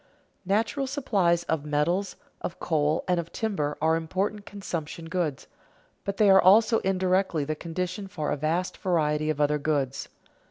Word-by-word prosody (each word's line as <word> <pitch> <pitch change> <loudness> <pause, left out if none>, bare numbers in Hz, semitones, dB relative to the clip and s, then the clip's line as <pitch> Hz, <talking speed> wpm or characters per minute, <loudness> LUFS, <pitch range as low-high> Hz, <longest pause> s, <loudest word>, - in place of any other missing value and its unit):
Natural 225 +7 +1
supplies 195 - +1
of 160 -3 -1
metals, 170 +6 0 0.3
of 170 - -5
coal, 155 -1 +1
and 180 -1 +2
of 170 0 -5
timber 170 -10 -2
are 160 +1 +3
important 190 +6 -2
consumption 170 -5 -5
goods, 165 -5 -2 0.6
but 200 0 -3
they 210 - +4
are 190 - +7
also 220 +4 +5
indirectly 185 -4 +1
the 155 - -1
condition 180 +5 -4
for 180 -6 -3
a - - +1
vast 160 +5 -1
variety 155 -4 0
of 155 -2 -1
other 150 0 +2
goods. 140 -3 -1
170 Hz, 155 wpm, -27 LUFS, 155-195 Hz, 0.6 s, are